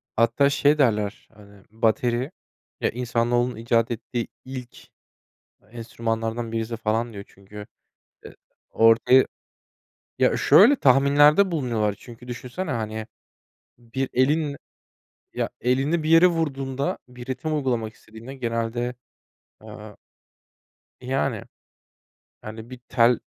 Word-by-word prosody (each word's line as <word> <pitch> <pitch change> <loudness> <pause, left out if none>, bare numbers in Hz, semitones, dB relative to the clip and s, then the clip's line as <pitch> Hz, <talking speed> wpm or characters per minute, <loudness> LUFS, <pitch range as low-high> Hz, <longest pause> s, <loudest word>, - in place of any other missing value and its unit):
Hatta 115 +5 +3
şey 145 +1 +3
derler, 105 -7 0
hani, 100 -2 -18
bateri, 120 +4 0 0.5
eee, - - +1
insanoğlunun 120 0 0
icat 115 +1 0
ettiği 120 0 -4 0.2
ilk 130 -2 -8 0.9
enstrümanlardan 115 0 -4
birisi 115 0 -3
falan 115 +1 -1
diyor. 100 -1 -8
Çünkü, 105 +2 -12 0.6
eee, - - -11 0.3
ortaya 115 +3 +5 0.9
Ya, - - +3
şöyle, 240 +9 +6
tahminlerde 145 - +5
bulunuyorlar 115 - -1
çünkü 120 0 -13
düşünsene, 125 +8 -5
hani, 110 -2 -4 0.7
bir 125 +3 -4
elin 145 +3 +1 0.8
ya, - - -2
elini 135 +7 +1
bir 155 - -3
yere 165 +2 +7
vurduğunda 140 -5 -2
bir 125 -1 -11
ritim 135 +4 -3
uygulamak 120 -6 -2
istediğinde 115 +4 -12
genelde, 120 -1 -3 0.7
eee - - -11 1.0
Yani. 130 -3 -2 1.0
Yani, 110 +2 -9
bir 130 - -9
tel 120 0 +3
120 Hz, 105 wpm, -24 LUFS, 115-135 Hz, 1.0 s, yere